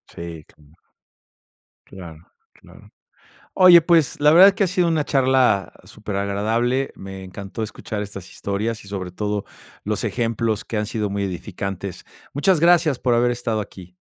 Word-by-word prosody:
sí, 85 -2 -8
claro. 75 -1 -24 1.1
Claro, 85 -5 -11 0.3
claro. - - -18 0.6
Oye, 180 -2 +8
pues 165 -5 +2
la 150 +1 +5
verdad 185 +4 +9
es 200 - +1
que 200 - +1
ha - - +1
sido 180 0 +1
una 155 -3 0
charla 130 -7 +2
super 105 0 -7
agradable. 115 +7 -1
Me 95 0 -9
encantó 100 +3 -7
escuchar 105 0 -5
estas 95 -2 -9
historias 105 +2 -4
y - - -13
sobre 95 -3 -5
todo 105 +1 -3 0.4
los - - -2
ejemplos 115 -2 -1
que 110 - -5
han 105 - -2
sido 105 -1 -2
muy 100 0 -2
edificantes. 95 0 -6 0.3
Muchas 160 +4 +2
gracias 170 -5 +4
por 125 -2 +1
haber 120 +1 +2
estado 115 -3 -2
aquí. 90 -3 -11
105 Hz, 160 wpm, -21 LUFS, 95-130 Hz, 1.1 s, verdad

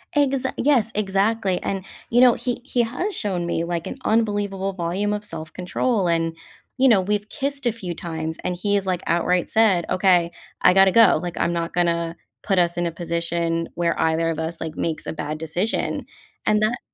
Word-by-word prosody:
Exa 275 -2 +2
Yes, 245 -6 +3
exactly, 200 -1 0
and, 195 -1 -3 0.2
you 240 - +3
know, 250 -2 +7
he 245 +1 -3
he 245 - +1
has 310 - -2
shown 185 -5 +1
me, 170 -1 -1
like, 170 -1 -3
an - - -6
unbelievable 205 -3 0
volume 185 +4 -1
of 210 0 -4
self-control, 180 +5 -2
and, 165 -1 0 0.4
you 265 +1 +4
know, 225 -6 +5
we've 205 +2 -2
kissed 275 -1 -2
a - - +3
few 190 -6 -6
times, 160 -1 -4
and 180 - -2
he 205 +3 0
has, 200 -1 +1
like, 180 -2 -1
outright 175 +1 +1
said, 210 -6 +3
"Okay. 180 -3 +3 0.3
I 180 - +6
gotta 195 0 +6
go, 230 +3 +6
like, 175 -1 -5
I'm 170 - +1
not 170 -1 -3
gonna 170 -1 0 0.3
put 195 - 0
us 170 -1 +3
in 175 - 0
a - - -3
position 170 0 -1
where 170 -1 0
either 160 +1 +1
of 160 - -3
us, 160 +1 -1
like, 160 -1 -5
makes 160 -2 -2
a - - -4
bad 155 0 -4
decision." 170 +7 -1 0.4
And 215 0 +2
that 225 +3 0
185 Hz, 195 wpm, -22 LUFS, 170-215 Hz, 0.4 s, know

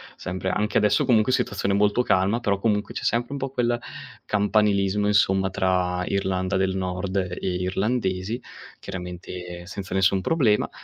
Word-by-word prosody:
sempre 95 +1 -5
anche 105 +2 0
adesso 105 +7 +3
comunque 125 -2 +3
situazione 100 -4 0
molto 105 +3 +3
calma, 100 +2 +2
però 105 -4 0
comunque 105 0 0
c'è - - -5
sempre 120 +4 0
un - - -3
po' 135 0 -2
quel 120 -2 0 0.5
campanilismo 105 -1 +2
insomma 95 -2 +3
tra 90 -1 0
Irlanda 95 -1 -1
del 95 0 +1
Nord 95 +1 -2
e 90 -2 -2 0.2
Irlandesi, 95 +3 -1 0.4
chiaramente 90 -1 -7
senza 95 0 -7
nessun 95 0 +3
problema, 120 - +2
100 Hz, 145 wpm, -24 LUFS, 95-105 Hz, 0.5 s, adesso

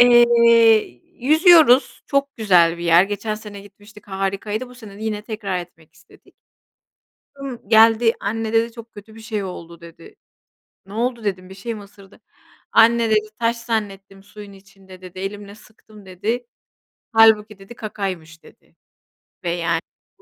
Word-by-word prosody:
Eee, 240 -1 +7 0.9
yüzüyoruz. 310 -2 +4
Çok 280 0 -1
güzel 175 -6 +3
bir 170 - -6
yer. 170 +2 +5
Geçen 205 +2 -4
sene 210 -2 -10
gitmiştik. 205 +1 -18
Harikaydı. 200 +5 -4
Bu 250 - -15
sene 210 -4 -13
de - - -10
yine 210 -1 -3
tekrar 210 -4 -4
etmek 160 -3 -13
istedik. 155 0 -23 1.0
Kızım 270 -7 -9
geldi. 225 +1 +5
"Anne" 220 +2 -4
dedi, 230 +1 +1
"Çok 230 0 -13
kötü 215 +2 -14
bir - - -12
şey 215 -2 -4
oldu" 170 -2 -9
dedi. 165 0 -15 0.7
"Ne 195 - -13
oldu?" 235 0 -2
dedim, 185 -2 -4
"Bir 190 - -11
şey 230 +4 -6
mi 210 - -10
ısırdı?" 200 -1 -18 0.5
"Anne" 230 0 +4
dedi, 215 0 +1
"Taş 235 0 0
zannettim 200 -4 -5
suyun 205 0 -13
içinde" 195 -1 -17
dedi, 185 0 -11
"Elimle 200 +1 -7
sıktım" 215 -1 -19
dedi. 220 +7 -4 0.7
"Hâlbuki" 215 -2 +4
dedi, 195 +5 -13
"Kakaymış" 185 -8 -6
dedi. - - -20 1.6
Ve, - - -26
210 Hz, 145 wpm, -20 LUFS, 195-230 Hz, 1.6 s, Eee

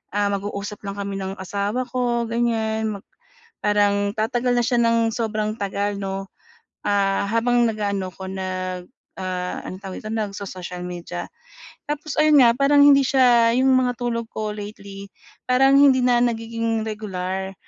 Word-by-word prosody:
ah, 205 0 +1
mag-uusap 200 +1 -4
lang 200 - -4
kami 200 -1 -4
ng 190 0 -4
asawa 200 +5 -2
ko, 240 -2 0
ganyan. 225 -1 0
Mag 200 - -11 0.6
parang 205 -1 +2
tatagal 240 +3 0
na 240 - +2
siya 240 +1 +1
nang 230 -1 +2
sobrang 215 -2 -2
tagal 200 +1 -2
'no, 195 0 -4 0.6
ah, 200 -1 +1
habang 240 +2 +2
nag-aano 200 -3 -2
ko 190 - -9
nag, 185 -1 -4 0.3
ah, 180 -1 -3
anong 185 +1 -8
tawag 190 - -6
dito, 215 - -7
nagso-social 195 -4 -5
media. 175 -1 -6 0.6
Tapos 300 0 -3
ayun 305 -1 +5
nga, 235 -1 +6
parang 285 +1 +4
hindi 280 -1 +7
siya, 240 -3 +4
'yung 265 +1 +4
mga 250 -2 +2
tulog 230 -2 -2
ko 215 -1 -3
lately, 200 -1 -9 0.4
parang 270 +2 +5
hindi 265 -2 +5
na 245 -1 +4
nagiging 230 -1 -1
regular 190 -3 -4
215 Hz, 150 wpm, -22 LUFS, 195-240 Hz, 0.6 s, hindi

